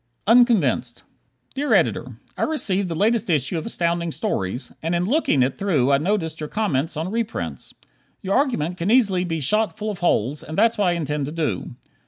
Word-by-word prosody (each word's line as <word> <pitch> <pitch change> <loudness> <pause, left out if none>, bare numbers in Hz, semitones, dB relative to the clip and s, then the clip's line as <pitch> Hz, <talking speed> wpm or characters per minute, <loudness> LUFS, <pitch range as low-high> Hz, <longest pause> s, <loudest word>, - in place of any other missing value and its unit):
Unconvinced 205 - +3 0.5
Dear 290 +2 +1
Editor: - - 0 0.2
I - - -6
received 200 - 0
the 165 - -3
latest 215 +4 +1
issue 155 +1 +1
of 160 - -7
Astounding 170 -4 -1
Stories, 95 -1 -3
and 165 +2 -1
in 175 +1 0
looking 215 - +2
it 130 +1 -2
through 150 -10 +2
I 140 - +4
noticed 160 -2 -1
your 150 -1 -5
comments 165 -7 -1
on 165 +4 -3
reprints. 230 0 -4 0.5
Your 195 +1 0
argument 180 - 0
can 170 +3 -2
easily 205 -7 +3
be 165 -2 -2
shot 210 +4 0
full 215 0 -3
of 200 - -8
holes, 145 -4 +1
and 160 - -7
that's 225 +2 +4
what 205 - +3
I 175 - +3
intend 150 -4 -2
to - - -5
do. 155 - -3
175 Hz, 190 wpm, -22 LUFS, 150-215 Hz, 0.5 s, I